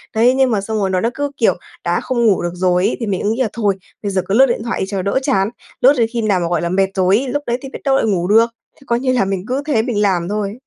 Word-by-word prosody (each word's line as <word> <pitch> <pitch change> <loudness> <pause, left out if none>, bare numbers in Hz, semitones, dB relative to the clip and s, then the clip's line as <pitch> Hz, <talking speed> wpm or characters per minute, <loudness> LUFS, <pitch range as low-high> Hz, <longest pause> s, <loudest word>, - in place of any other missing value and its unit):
Đấy, 235 +3 +4
nhưng 265 -1 +3
mà 205 -3 +1
xong 220 +2 -3
rồi 195 -2 0
nó 185 -1 +1
đã 230 - 0
cứ, 285 +1 -3
kiểu, - - +3 0.3
đã - - 0
không 240 -2 -1
ngủ 205 -5 +3
được 175 0 -2
rồi 180 0 +1
ấy - - -2
thì 230 - -2
mình 195 -3 -2
ứ 205 - 0
nghĩ 230 +4 -1
là 230 - +1
thôi, 205 -4 0 0.3
bây 200 - -2
giờ 190 - +1
cứ 195 - -1
lướt 260 +5 +6
điện 235 -4 -2
thoại 235 - -3
đi - - 0
cho 195 -2 -2
đỡ 200 +7 0
chán. 210 -8 +1 0.3
Lướt 270 +3 +6
đến 230 -2 +3
khi 235 - -1
nào 205 -4 +1
mà, 170 - -1
gọi 175 -2 0
là, 170 - -1
mệt 190 +2 +2
rồi 190 +1 +3
ấy, 265 - -2
lúc 290 +3 -2
đấy 240 0 0
thì 270 - -7
biết - - -8
đâu 275 -2 +2
lại 270 - +2
ngủ 180 -5 0
được. 225 +3 +4 0.3
Thì 275 - -19
coi 235 0 +1
như 255 0 0
là 245 -6 +2
mình 190 -1 -3
cứ 260 +3 -1
thế 280 -8 +2
mình 225 -3 -1
làm 185 -3 +1
thôi. 205 -1 -2
215 Hz, 330 wpm, -18 LUFS, 195-245 Hz, 0.3 s, lướt